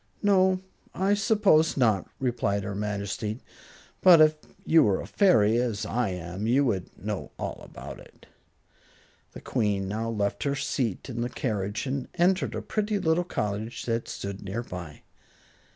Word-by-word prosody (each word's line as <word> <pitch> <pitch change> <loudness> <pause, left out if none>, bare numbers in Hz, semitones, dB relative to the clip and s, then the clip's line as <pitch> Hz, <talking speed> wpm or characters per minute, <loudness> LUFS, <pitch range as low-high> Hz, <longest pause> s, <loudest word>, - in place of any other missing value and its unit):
"No, 190 -2 +4 0.3
I 195 +2 +2
suppose 200 -7 +3
not," 110 -7 +2
replied 110 -6 0
her 100 +1 -4
Majesty. 105 +2 -3 0.6
"But 180 -3 +8
if 155 0 +6 0.3
you 160 0 +6
were 100 -7 +3
a - - -5
fairy, 115 - +4
as 110 -4 -2
I 115 0 0
am, 90 +3 -4
you 135 +4 +3
would 95 -8 -1
know - - -4
all - - -5
about - - -9
it." - - -17 1.1
The - - -9
Queen 105 -5 0
now 110 +3 -2
left 105 -3 -1
her 140 -1 0
seat 125 -7 -2
in 120 -3 -4
the 120 - -1
carriage 105 -5 -2
and 135 -1 -3
entered 185 +2 +2
a - - -4
pretty 210 -1 -1
little 165 -2 +2
cottage 105 - -3
that 115 -1 -1
stood 100 0 -6
near 100 +4 -4
by. 90 -8 -8
115 Hz, 155 wpm, -27 LUFS, 100-160 Hz, 1.1 s, But